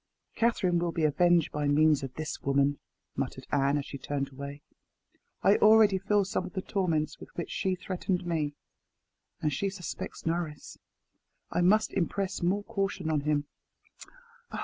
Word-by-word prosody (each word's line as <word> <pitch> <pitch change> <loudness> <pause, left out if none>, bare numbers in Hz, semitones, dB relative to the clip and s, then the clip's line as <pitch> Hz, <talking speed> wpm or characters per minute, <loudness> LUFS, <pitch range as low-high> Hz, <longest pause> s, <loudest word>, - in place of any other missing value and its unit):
"Catherine 190 -7 +2
will 170 0 0
be 165 - -2
avenged 170 +2 +3
by 150 -1 -1
means 150 0 +4
of 135 -2 -6
this 155 -1 -5
woman," 140 +1 +2 0.4
muttered - - -4
Anne 140 0 +2
as 140 - -3
she 140 - -7
turned 140 0 -3
away. 140 +2 -7 0.8
"I 200 - +6
already 215 -2 +6
feel 200 +1 +2
some 190 - -1
of 180 -1 -8
the 190 - -2
torments 165 -6 -1
with - - -11
which 170 - -4
she 190 -1 0
threatened 185 0 -2
me. 155 -4 -1 0.9
And 150 -1 +1
she 195 +9 0
suspects 190 -3 -7
Norris. 165 -2 -3 0.7
I - - +1
must 215 +5 +3
impress 195 +1 -1
more 190 +4 +1
caution 195 -5 -2
on 155 - +2
him. 145 0 0
170 Hz, 155 wpm, -29 LUFS, 145-190 Hz, 0.9 s, I